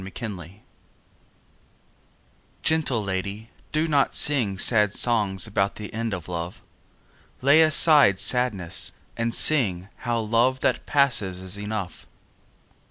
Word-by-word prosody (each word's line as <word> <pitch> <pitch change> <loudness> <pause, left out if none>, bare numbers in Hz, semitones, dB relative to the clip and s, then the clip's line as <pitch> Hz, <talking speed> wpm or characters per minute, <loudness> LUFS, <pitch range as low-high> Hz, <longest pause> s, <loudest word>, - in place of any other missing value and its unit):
XXVIII 95 -1 -9 2.0
Gentle 150 -8 +1
lady, 100 +3 -6 0.2
do 155 +1 -1
not 145 -3 0
sing 120 -10 +3
Sad 105 0 +3
songs 105 -6 +1
about 100 -2 -2
the 105 -1 -10
end 115 +1 -4
of 90 -4 -10
love; 85 0 -7 0.8
Lay 145 +4 +5
aside 155 - +5
sadness 105 -8 0 0.2
and 115 0 -2
sing 100 -11 +2
How 120 -1 -3
love 115 +4 0
that - - -2
passes 110 -10 +1
is 95 +1 -5
enough. 105 -4 -7
110 Hz, 110 wpm, -23 LUFS, 95-130 Hz, 2.0 s, Lay